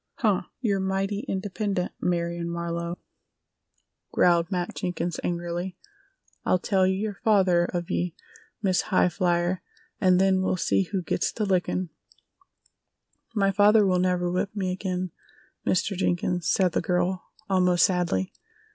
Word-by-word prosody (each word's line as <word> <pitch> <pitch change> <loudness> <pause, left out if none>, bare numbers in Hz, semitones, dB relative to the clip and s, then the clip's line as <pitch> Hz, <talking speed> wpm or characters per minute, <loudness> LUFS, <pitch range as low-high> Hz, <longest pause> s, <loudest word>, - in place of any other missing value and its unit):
"Huh! 210 -5 +2 0.2
You're 205 -6 +1
mighty 195 +1 -1
independent, 195 -1 -2
Marion 170 -1 -1
Marlowe!" 170 0 -3 1.1
growled 170 -1 +3
Matt 180 -2 -2
Jenkins 175 -2 -3
angrily. 175 +1 -3 0.7
"I'll - - +3
tell 190 +1 +2
yer 200 +2 -1
father 185 -5 +4
of 175 -1 -4
ye, 175 -1 -1 0.5
Miss 185 -2 +3
High 185 -2 +4
flyer, 175 0 0 0.4
an' 185 -2 +4
then 190 0 +3
we'll 185 0 0
see 190 - +1
who 190 -3 -1
gits - - 0
the 215 - -2
lickin'." 185 -2 0 1.4
"My 195 -2 +3
father 205 +2 +5
will 185 -2 +2
never 180 -1 +1
whip 190 +3 -2
me 190 -3 -1
again, 185 -1 -3 0.6
Mr. 195 +2 +1
Jenkins," 175 -1 0
said 185 -2 +3
the - - 0
girl, 180 0 0 0.2
almost 180 -3 +4
sadly. 175 - 0
180 Hz, 130 wpm, -26 LUFS, 175-195 Hz, 1.4 s, father